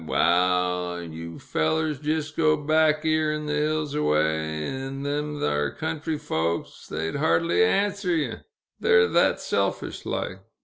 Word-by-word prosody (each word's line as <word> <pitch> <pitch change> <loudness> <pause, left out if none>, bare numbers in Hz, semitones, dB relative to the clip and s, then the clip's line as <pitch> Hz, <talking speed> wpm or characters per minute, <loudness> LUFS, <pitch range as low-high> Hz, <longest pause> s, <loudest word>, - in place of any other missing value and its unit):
Waal, 90 0 +1
yew 85 0 -8
fellers 150 - -1
jist 155 0 -2
go 155 -1 +3
back 155 +1 +2
'ere 155 -1 +2
in 150 0 -4
th' 150 - -2
hills 150 0 0
away, 80 - 0
'n 135 +1 -5
them 150 +1 -2
thar 75 0 0
country 160 0 -3
folks 85 - -3
they'd 80 +1 -3
hardly 85 +1 +3
answer 195 - +1
ye, 145 -8 -1 0.5
they're 90 0 +5
thet - - +3
selfish - - -2
like. - - -3
140 Hz, 135 wpm, -25 LUFS, -, 0.5 s, they're